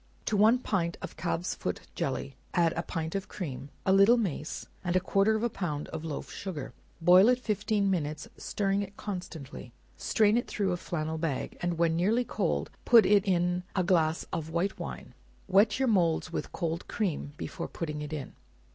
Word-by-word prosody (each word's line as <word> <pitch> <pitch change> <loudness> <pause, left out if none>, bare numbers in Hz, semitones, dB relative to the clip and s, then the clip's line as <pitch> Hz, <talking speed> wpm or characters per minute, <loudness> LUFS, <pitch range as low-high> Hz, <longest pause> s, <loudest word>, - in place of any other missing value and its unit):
To 215 - 0
one 215 +4 +6
pint 180 -8 -1
of - - -6
calf's 175 0 -2
foot - - -4
jelly, - - -3 0.2
add 170 -2 +3
a 170 - 0
pint 165 -2 -4
of 195 0 -3
cream, 140 -6 -6 0.2
a 190 - +4
little 200 +5 +7
mace, 165 -8 -3 0.2
and 175 -1 -1
a - - +6
quarter 195 +3 +2
of 220 - -1
a - - +4
pound 155 -7 -3
of 155 - -5
loaf 155 -3 -5
sugar; 160 -9 -6 0.3
boil 180 +6 +7
it 250 - +4
fifteen 210 -3 0
minutes, 155 +1 -2
stirring 195 -1 -1
it 200 0 -7
constantly; 160 - -7 0.2
strain 215 +1 +3
it 240 - -1
through 200 -3 0
a 180 - 0
flannel 160 -2 -3
bag, 155 -5 -2
and 175 -1 -1
when 165 -1 +2
nearly 215 +8 +2
cold - - -1
put 230 -4 +7
in 200 0 +5 0.5
n 185 -2 +2
glass 165 -3 +2
of 160 -1 -3
white 170 +4 -1
wine; - - -7 0.3
wet 200 +3 +4
your 265 0 +1
moulds 175 -8 +2
with - - -3
cold 165 -1 -3
cream 170 -8 -2
before 170 - -5
putting 150 -3 -4
it 150 0 -6
in. 145 -4 -5
180 Hz, 185 wpm, -29 LUFS, 160-205 Hz, 0.5 s, little